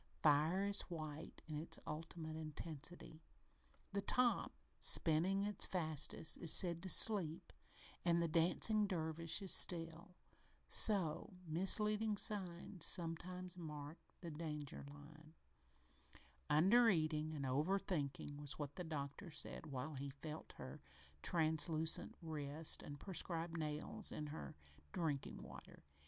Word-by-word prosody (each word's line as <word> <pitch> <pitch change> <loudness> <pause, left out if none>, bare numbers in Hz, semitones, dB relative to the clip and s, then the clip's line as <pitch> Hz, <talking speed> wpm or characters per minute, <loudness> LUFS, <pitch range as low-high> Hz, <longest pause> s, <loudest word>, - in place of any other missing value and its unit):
Fire 155 +6 +3
is 200 0 +4
white 155 -2 -8
in 150 -2 -4
its 160 - -2
ultimate 160 0 -6
intensity. 160 +1 -7 0.7
The 200 - -1
top, 245 +4 +2 0.3
spinning 180 +5 +4
its 205 -1 +1
fastest, 160 -2 -1
is 165 - +4
said 170 -2 +6
to 185 - -5
"sleep" 180 -5 +4 0.5
and 170 -1 +2
the 170 - +1
dancing 180 +6 +3
dervish 165 0 -2
is 190 - 0
"still." 170 +1 +5 0.5
So, 185 -3 +2
misleading 210 +6 +3
signs 185 -4 -2
sometimes 180 +2 -2
mark 150 -1 -8 0.2
the 170 -2 -7
danger 150 -2 -6
line. 155 +2 -15 1.1
"Under 210 +10 +5
eating 155 -4 0
and 140 -2 -4
over 150 +9 0
thinking" 145 -6 -4
was 145 -1 -4
what 145 -1 -6
the 180 - -4
doctor 155 +3 -6
said 155 - -5
while 140 +2 -5
he 140 0 -6
felt 150 +3 -9
her - - -10 0.4
translucent 160 +1 +1
wrist 155 -1 -2
and 145 -1 -9
prescribed 170 -1 -2
nails 150 -2 -3
in 150 - -5
her - - -8 0.4
drinking 150 -5 -3
water. - - -13
160 Hz, 120 wpm, -40 LUFS, 150-180 Hz, 1.1 s, said